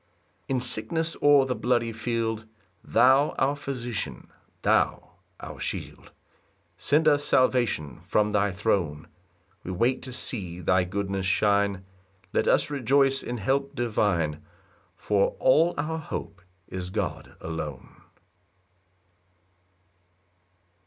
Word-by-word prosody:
4 135 - 0
In 125 - 0
sickness 160 +6 0
or 145 -2 +6
the 130 - -1
bloody 115 +1 +1
field, 115 -1 -2 0.4
Thou 135 +4 +4
our 135 +2 +2
physician, 120 - -5 0.3
thou - - +1 0.3
our - - -9
shield, - - -5 0.7
Send 150 +2 +2
us 145 -1 +4
salvation 120 - +1
from 105 0 +2
thy 105 -1 +2
throne; 90 -7 -1 0.6
We - - -7
wait 120 +8 +1
to 130 - -8
see 95 -8 -3
thy 90 +1 +2
goodness 95 0 -2
shine; 100 -1 +2 0.5
Let - - +1
us - - +3
rejoice 135 0 +2
in 120 - -4
help 135 +6 -1
divine, 100 -10 0 0.5
For 100 -2 +1
all 160 +6 +4
our 160 +2 -2
hope 100 - -6 0.3
is 90 -1 -5
God 100 -2 -4
alone. 80 -4 -7
115 Hz, 110 wpm, -26 LUFS, 95-135 Hz, 0.7 s, or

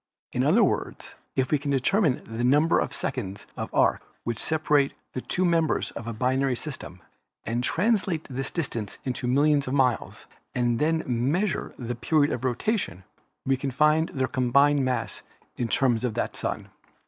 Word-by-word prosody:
In - - 0
other - - +5
words, - - -2 0.2
if 130 -1 0
we 150 - +3
can 145 0 -4
determine 140 - +2
the 115 +1 -4
number 145 +6 +4
of - - -1
seconds 100 -6 -4
of - - -5
arc - - +3 0.2
which 115 -2 -3
separate 150 -3 +2 0.2
the 130 - -3
two 185 +7 0
members 165 -3 +1
of 115 - -8
a - - -2
binary 130 +3 +1
system 120 - -7 0.4
and 120 +2 -1
translate 185 - +1
this 135 0 -4
distance 120 - -3
into 125 -1 -3
millions 145 +2 +3
of 130 - -1
miles 125 -5 0 0.3
and 120 -1 +1
then 160 +1 +1
measure 140 - 0
the 120 -1 -4
period 145 +5 +2
of 125 - -4
rotation, 130 - -1 0.4
we 135 - +3
can 135 +1 -3
find 150 +4 +3
their 130 -2 -1
combined 140 +3 +3
mass 130 -1 -2 0.3
in 120 - -1
terms 120 -1 +2
of 120 -4 -1
that - - 0
of - - -30
the - - -10
Sun. - - -3
135 Hz, 175 wpm, -26 LUFS, 120-150 Hz, 0.4 s, other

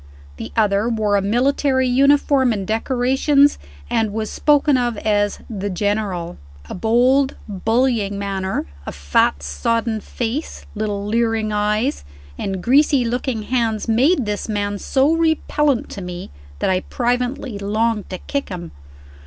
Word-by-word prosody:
The 110 - -7
other 210 +1 +2
wore 215 -3 +1
a 200 - +3
military 260 +5 +1
uniform 275 0 +3
and 200 -3 -2
decorations, 265 +6 +2 0.3
and 220 - 0
was 215 0 -3
spoken 295 -1 +3
of 240 -3 0
as 205 -1 0
"the 205 -3 -4
General." 195 -3 -2 0.3
A - - -7
bold 250 +6 +2
bullying 220 0 0
manner, 195 -1 -2 0.2
a - - -3
fat 70 0 +1
sodden 220 - -1
face, 245 +9 -4
little 205 -2 -3
leering 225 0 0
eyes, 210 +6 0 0.3
and 190 - -4
greasy 275 0 +4
looking 240 -1 -2
hands, 225 -2 -1
made 255 +5 +3
this 210 +1 -3
man 205 -1 -2
so 275 +8 +2
repellent 300 -5 +1
to 200 - -7
me 180 - -7 0.3
that - - 0
I 185 - +2
privately 245 0 -2
longed 215 +1 -1
to 185 - -4
kick 280 +8 -4
him. 175 -3 -7
225 Hz, 135 wpm, -20 LUFS, 205-260 Hz, 0.3 s, greasy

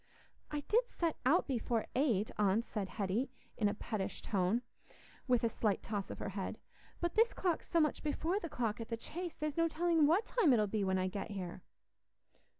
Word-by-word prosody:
"I 295 -1 -2
did 465 - +2
set 335 -2 -1
out 340 +7 +5
before 235 -3 0
eight, 235 -7 +2
aunt," 210 +3 +2
said 200 -4 -3
Hetty, 210 +5 -1 0.3
in 210 -2 +2
a - - -3
pettish 210 -2 -3
tone, 200 +4 +1 0.6
with 250 -2 +3
a - - +5
slight 215 -2 0
toss 205 -3 -3
of - - -5
her - - -4
head. 195 +2 -4 0.4
"But 345 -1 -1
this 460 +2 +4
clock's 350 -4 -1
so 335 - +3
much 305 -2 +2
before 320 +5 0
the 335 - -5
clock 230 -4 -1
at 230 - -6
the 230 - -2
Chase, 345 +8 -5
there's 305 0 -3
no 330 0 +4
telling 330 -1 +3
what 360 +8 +3
time 405 - +4
it'll 215 -3 +4
be 205 0 -1
when 190 -1 +2
I 185 0 +1
get 200 +3 -4
here." 185 -3 -5
235 Hz, 200 wpm, -35 LUFS, 205-325 Hz, 0.6 s, out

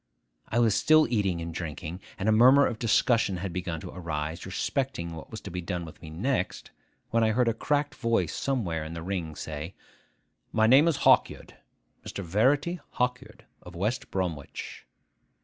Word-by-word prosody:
I 115 - -1
was 115 -3 +4
still 155 +7 +5
eating 95 -6 +1
and 85 0 -5
drinking, 85 +2 -5 0.2
and 100 -1 -2
a - - +5
murmur 130 +6 +7
of 110 - -2
discussion 115 -3 +2
had 90 0 -4
begun 90 -2 -3
to - - -8
arise 80 -1 -4
respecting 95 - -2
what 80 - -10
was 110 - -7
to 100 - -8
be 90 +1 -4
done 90 -1 -4
with 80 - -12
me 80 - -9
next, 95 - -2 0.4
when 115 0 +3
I 110 - +3
heard 125 +1 +2
a 115 - +3
cracked 145 +5 0
voice 115 -1 0
somewhere 95 - -1
in 80 +1 -7
the 85 - -6
ring 85 -4 -3
say, 75 +3 -6 0.8
'My 110 0 +4
name 135 +8 +6
is 165 - 0
Hawkyard, - - +3 0.5
Mr. 100 - -6
Verity 140 - +2
Hawkyard, 125 0 -3 0.2
of 90 -1 -12
West 105 +8 -2
Bromwich. 85 -7 -4
100 Hz, 175 wpm, -28 LUFS, 85-120 Hz, 0.8 s, murmur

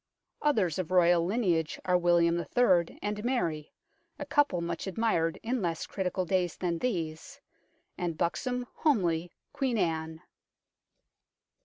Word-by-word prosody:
Others 205 - +1
of 180 - -3
Royal 175 -2 +4
lineage 175 -5 0
are 180 - +2
William 170 -1 +3 0.2
III. 185 -9 +3
and 210 0 -3
Mary, 170 - -1 0.5
a 290 - -5
couple 290 -9 +2
much 170 +1 -4
admired 185 -5 0
in 240 +1 -1
less 170 -3 -2
critical 185 -1 -2
days 180 -1 0
than 170 -2 -1
these, 165 -9 -3 0.6
and 170 -3 -2
buxom, 250 +9 -1
homely 175 - +1 0.2
Queen 270 -5 0
Anne. 160 -2 -2
180 Hz, 125 wpm, -29 LUFS, 170-225 Hz, 0.6 s, Royal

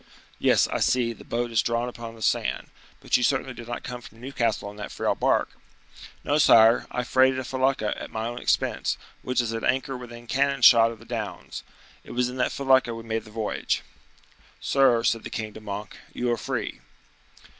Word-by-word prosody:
"Yes, - - +4
I - - -2
see; 120 -2 +2
the - - -14
boat 120 0 -2
is 115 - +3
drawn 115 +1 -1
upon 115 -2 -8
the 110 - -9
sand; - - 0 0.3
but - - +1
you - - -3
certainly 135 +1 +1
did 120 -1 -10
not 120 0 -5
come 125 0 -6
from 115 -1 -14
Newcastle 120 -5 -1
in 105 - -15
that 105 - -6
frail - - 0
bark?" - - +1 0.7
"No, 145 +1 +1
sire; 115 -5 +6
I 125 - -2
freighted 130 +1 +3
a 130 - -2
felucca, 130 -4 0
at - - -6
my 110 0 -4
own 120 +1 -4
expense, - - 0 0.2
which 125 0 -1
is 115 -2 0
at 115 - -4
anchor 135 +1 0
within 120 -1 -9
cannon 135 +1 0
shot 115 0 +8
of 115 - -8
the 115 - -16
downs. - - -5 0.4
It - - -10
was 125 0 +1
in 125 - -7
that 125 - +1
felucca 130 -3 +2
we 115 - -8
made 115 0 -3
the - - -13
voyage." 110 0 -2 0.8
"Sir," 130 -4 +3
said 115 -1 +1
the - - -6
king 110 -1 -5
to 110 - -10
Monk, 105 -1 -6 0.2
"you 120 0 -1
are 120 - 0
free." 105 - -4
120 Hz, 205 wpm, -25 LUFS, 115-130 Hz, 0.8 s, shot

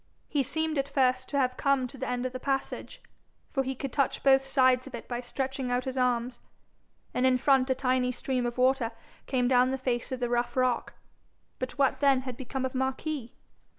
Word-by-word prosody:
He 290 - +1
seemed 315 +3 -1
at 275 +1 -1
first 255 -2 +1
to 285 - -1
have 255 -2 +1
come 275 -2 +2
to 250 - -9
the 265 0 -4
end 250 0 -1
of 255 - -3
the 255 - -4
passage, 275 - -3 0.5
for 270 - +1
he 265 0 -3
could 270 0 -5
touch 275 -2 0
both 270 0 +5
sides 260 -1 +3
of 265 - -7
it 235 - -9
by 240 -1 -3
stretching 265 +1 -3
out 245 +1 0
his 260 0 -4
arms, 245 -1 0 0.7
and 250 - 0
in 260 -1 +4
front 265 0 +3
a 260 - +3
tiny 255 -1 +1
stream 250 0 -1
of 240 - -5
water 255 -2 +2 0.3
came 250 -2 +1
down 250 0 +4
the 265 - -1
face 250 -2 -2
of 260 - -3
the 245 - 0
rough 240 +1 -1
rock; 255 -1 +1 0.6
but 255 +2 -4
what 275 -2 +2
then 275 -2 +4
had 255 -2 -6
become 260 +1 -4
of 260 - -3
Marquis? 265 0 -3
255 Hz, 215 wpm, -29 LUFS, 250-270 Hz, 0.7 s, both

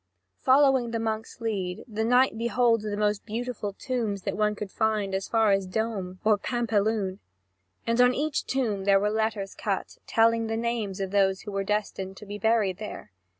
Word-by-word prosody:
Following 265 -2 +4
the 230 0 -2
monk's 220 +1 -4
lead, 195 -5 -2
the 220 -1 -2
knight 245 +2 +4
beholds 235 -1 +2
the 210 -1 -3
most 210 -1 0
beautiful 225 -2 -4
tombs 220 -5 -3
that - - -2
one 210 0 +1
could 205 -2 -6
find 215 -3 0
as 190 0 -2
far 225 -2 +3
as 195 -1 +1
Dombes 195 -2 -3
or 215 -1 +4
Pampelune; 215 -4 0 0.7
and 230 +1 +2
on 250 0 +5
each 300 +1 -1
tomb 220 -8 -1
there 200 -1 +5
were 210 +1 +1
letters 220 -2 -1
cut, 200 -3 -3
telling 225 +1 +3
the 225 0 -2
names 225 -4 -2
of 195 -1 -3
those 195 -1 +2
who 210 - -7
were 195 0 -1
destined 195 -2 -2
to 210 - -10
be 205 +1 -7
buried 210 -3 +2
there. 210 - -7
215 Hz, 185 wpm, -27 LUFS, 200-230 Hz, 0.7 s, on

